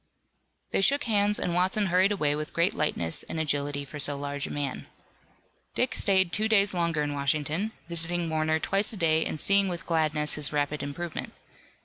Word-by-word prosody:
They - - +1
shook 280 +8 +3
hands 210 -3 +2
and 175 - -1
Watson 185 +4 +1
hurried 185 +2 +3
away 150 -8 +1
with 150 0 -5
great 170 +4 +2
lightness 85 - -1
and 160 - -6
agility 145 -2 -1
for 150 +2 -8
so 145 0 +3
large 145 0 -4
a - - -7
man. 145 -2 -4 0.9
Dick 250 - +1
stayed 190 -3 +2
two 215 +1 +2
days 200 -3 +3
longer 170 -4 0
in 145 0 -2
Washington, 150 +8 -1 0.2
visiting 170 0 0
Warner 155 0 +1
twice 195 +5 +1
a 220 - -7
day 160 -2 +3
and 155 - -4
seeing 200 +3 +4
with 175 -2 -4
gladness 155 -2 0
his 150 -2 -2
rapid 145 0 -1
improvement. 150 +4 -5
165 Hz, 180 wpm, -27 LUFS, 145-190 Hz, 0.9 s, seeing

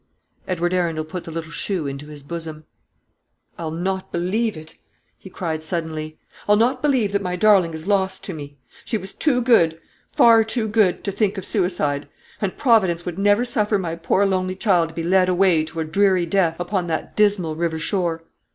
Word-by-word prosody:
Edward 175 -1 -1
Arundel 165 -4 0
put 180 +2 -7
the 165 - -7
little 165 0 -6
shoe 175 +1 -2
into 140 +1 -6
his 150 -2 -10
bosom. 160 0 -7 0.9
"I'll 165 -2 -3
not 185 +4 -3
believe 195 +4 -1
it," 155 0 -11 0.5
he 190 - -12
cried 160 -4 -4
suddenly; 155 -1 -4 0.3
"I'll 210 - +7
not 250 +4 +2
believe 260 -9 +2
that 200 0 0
my 180 -2 -2
darling 185 -4 +4
is 160 +1 -7
lost 190 -1 0
to 190 - -5
me. 145 -2 -9 0.3
She 230 - -2
was 190 -1 -7
too 255 -5 +1
good, 170 -10 +4 0.3
far 230 -1 +6
too 220 0 -2
good, 205 -4 +2
to 200 - -2
think 200 0 0
of 190 - -5
suicide; 175 -8 -1 0.3
and 195 -3 -2
Providence 190 -9 +3
would 175 +1 -5
never 205 +4 +3
suffer 215 -4 +1
my 170 -4 -3
poor 170 +4 +1
lonely 185 -1 0
child 180 -5 +2
to 165 - -14
be 165 - -3
led 185 +1 +3
away 180 -3 +3
to 160 +1 -5
a - - -2
dreary 185 +2 +2
death 170 -2 +1
upon 175 0 -2
that 160 -1 -3
dismal 200 -7 +2
river 165 0 -1
shore. 165 -1 -1
180 Hz, 190 wpm, -22 LUFS, 165-200 Hz, 0.9 s, I'll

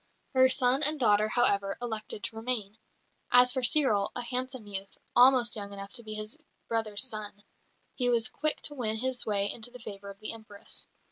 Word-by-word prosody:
Her 260 0 +5
son 255 +1 +2
and 305 0 +2
daughter, 210 -3 +3
however, 200 -5 +1
elected 220 -4 -5
to 225 - -4
remain. 225 -2 -3 0.5
As 250 0 +6
for 260 - -1
Cyril, 245 -6 +3
a - - -3
handsome 255 -1 -3
youth, 195 -1 -5 0.2
almost 250 -1 +5
young 200 -2 -3
enough 200 0 -8
to 250 - +4
be 215 -1 -5
his 215 +1 -4 0.3
brother's 220 -1 +1
son, 215 -4 -5 0.5
he 245 -2 0
was 235 -2 +3
quick 305 +1 0
to 295 - -3
win 225 -6 -1
his 255 +1 -2
way 200 -1 +1
into 230 +1 0
the 250 - -12
favour 200 -4 -9
of 200 0 -11
the 215 - -2
Empress. 220 -3 -8
225 Hz, 190 wpm, -29 LUFS, 205-250 Hz, 0.5 s, As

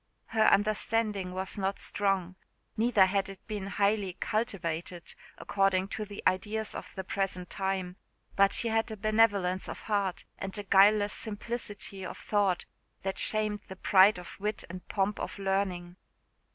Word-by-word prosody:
Her 220 -1 +3
understanding 210 -2 +2
was 190 +3 -4
not 195 0 -1
strong 195 -3 0 0.4
neither 220 -3 +5
had 195 0 0
it 195 -1 -11
been 205 -3 -4
highly 200 -1 +1
cultivated, 175 -6 -3 0.2
according 195 -1 +1
to 215 - -4
the 205 0 -9
ideas 210 +4 0
of - - -7
the 190 - -4
present 185 -2 -3
time; 190 -1 -2 0.4
but 195 0 +5
she 235 - 0
had 225 +1 +1
a 220 - -6
benevolence 205 -3 +2
of - - -7
heart 200 -4 -1
and 195 +1 -4
a 205 - -3
guileless 205 +1 +5
simplicity 205 -3 -5
of - - -6
thought 200 -4 +1 0.4
that 195 0 -1
shamed 215 -1 +2
the 190 - -8
pride 190 +1 +5
of 180 +2 -10
wit 210 +2 -2
and 185 0 -9
pomp 200 +1 0
of - - -5
learning. 190 -2 -1
195 Hz, 150 wpm, -30 LUFS, 190-210 Hz, 0.4 s, neither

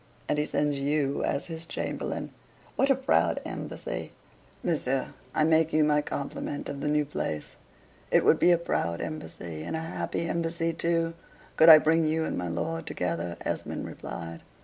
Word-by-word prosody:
And 150 - +1
he 150 - 0
sends 145 -1 0
YOU 140 0 +1
as - - -1
his 165 -1 -7
chamberlain! - - -3 0.4
What 275 - +2
a 275 - +6
proud 265 +1 +2
embassy! - - -5 0.5
Monsieur, 135 -6 0 0.2
I 155 - +3
make 160 0 +4
you 155 0 +4
my 150 0 +3
compliment 145 0 -4
of 140 -1 -5
the - - -1
new 150 0 +2
place." 80 - -4 0.5
"It - - +4
would - - +5
be - - +5
a 175 - +6
proud 85 - -1
embassy, 85 - -6
and 120 - -4
a - - -1
happy 165 +1 -3
embassy 165 0 -1
too, 165 0 0 0.4
could 160 - +7
I 160 - +13
bring 160 +1 +3
you 160 +1 +1
and - - -2
my 90 - -2
lord 165 - -3
together," 85 -1 -2
Esmond - - -3
replied. 85 0 -7
155 Hz, 170 wpm, -28 LUFS, 140-165 Hz, 0.5 s, I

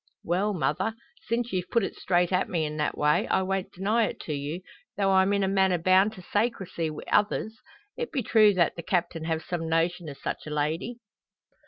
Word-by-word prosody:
"Well, 195 +4 0
mother, 220 +5 0 0.3
since 235 0 -1
you've 180 -1 -2
put 235 -3 +2
it - - -3
straight 175 -1 +1
at 185 - +1
me 165 -3 0
in 150 0 -4
that 150 - -1
way, 150 0 +2
I 190 - +2
won't 195 0 -2
deny 215 +5 +1
it - - -7
to 155 - -4
you, 145 +5 -4 0.4
tho' 195 -1 +2
I'm 190 +1 +4
in 200 -1 +2
a - - +2
manner 190 -2 +3
bound 185 +5 +4
to 185 - -11
saycrecy 190 -6 -1
wi' 155 - -7
others. 215 +1 +1 0.4
It 475 -1 -3
be 275 -6 -1
true 215 -2 +5
that 170 -3 +2
the 170 - -5
Captain 170 -2 -1
have 160 -1 -1
some 165 -2 -3
notion 165 0 0
o' - - -6
such 140 - -5
a - - -4
lady." 155 +10 -2
185 Hz, 210 wpm, -27 LUFS, 165-205 Hz, 0.4 s, true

